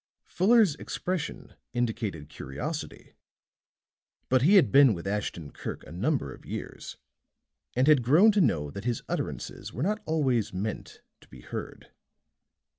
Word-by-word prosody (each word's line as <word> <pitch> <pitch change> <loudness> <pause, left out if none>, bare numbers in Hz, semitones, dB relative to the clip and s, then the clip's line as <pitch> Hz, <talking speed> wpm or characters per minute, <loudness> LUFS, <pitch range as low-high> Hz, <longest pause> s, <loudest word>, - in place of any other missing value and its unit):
Fuller's 210 -2 +4
expression 180 -5 -4 0.2
indicated 110 -10 -2
curiosity; 70 +1 -6 1.2
but 130 0 +4
he 180 +10 +5
had 140 - +6
been 135 -6 +7
with 85 - -8
Ashton 95 -7 -3
Kirk - - -6
a - - -12
number 95 - -1
of - - -15
years - - -7 0.8
and 130 +2 +3
had 150 -4 +6
grown 160 - +6
to 205 -1 +2
know 75 - +1
that 100 - -7
his 120 -2 -1
utterances - - -4
were 125 - -3
not 210 +4 0
always 135 -8 +1
meant 100 +4 -5 0.2
to - - -20
be 65 - -14
heard. - - -8
125 Hz, 140 wpm, -28 LUFS, 95-155 Hz, 1.2 s, been